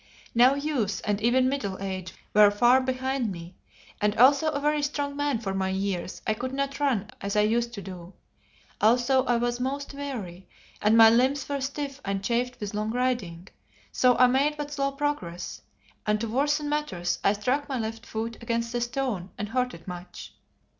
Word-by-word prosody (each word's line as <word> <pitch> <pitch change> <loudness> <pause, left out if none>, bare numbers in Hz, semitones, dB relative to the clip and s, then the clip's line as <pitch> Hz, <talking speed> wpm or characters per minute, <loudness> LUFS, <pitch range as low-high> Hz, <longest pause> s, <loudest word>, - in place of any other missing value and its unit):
Now 250 +3 +6
youth 270 -10 -1
and 205 0 0
even 255 +3 +3
middle 220 -9 -2
age 190 -2 -5 0.2
were 210 0 +7
far 240 +5 +4
behind 260 -2 -1
me, 170 0 -9 0.5
and 210 0 +1
although 280 +6 +6
a 285 - -2
very 300 +1 +1
strong 285 0 -2
man 290 -3 0
for 205 -4 -4
my 190 0 -1
years, 190 -1 -3
I 215 - +2
could 255 +4 -4
not 275 0 -2
run 245 -7 0
as 200 +1 -3
I 210 - +5
used 235 +3 +1
to 200 - -7
do. 180 -1 -9 0.7
Also 245 +4 +4
I 245 - +2
was 240 +1 -1
most 280 +3 -3
weary, 220 -11 -6 0.3
and 215 +2 +4
my 225 -1 +9
limbs 260 +4 +2
were 280 -1 -2
stiff 275 +1 -4
and 195 0 -2
chafed 245 +3 -1
with 205 -1 -5
long 210 +1 -2
riding, 225 -8 -2 0.4
so 250 -1 +3
I 250 - +7
made 275 +4 +2
but 295 -1 -5
slow 275 -1 0
progress, 275 -12 -3 0.5
and 210 0 +2
to 230 - -2
worsen 290 +5 0
matters 290 -13 -1
I 200 - +4
struck 255 +8 -1
my 265 - -1
left 225 0 -4
foot 225 +1 -4
against 235 0 -2
a 240 - -1
stone 240 -6 -2
and 210 0 -4
hurt 250 +1 -1
it 165 +2 -15
much. 180 0 -8
240 Hz, 190 wpm, -27 LUFS, 205-275 Hz, 0.7 s, my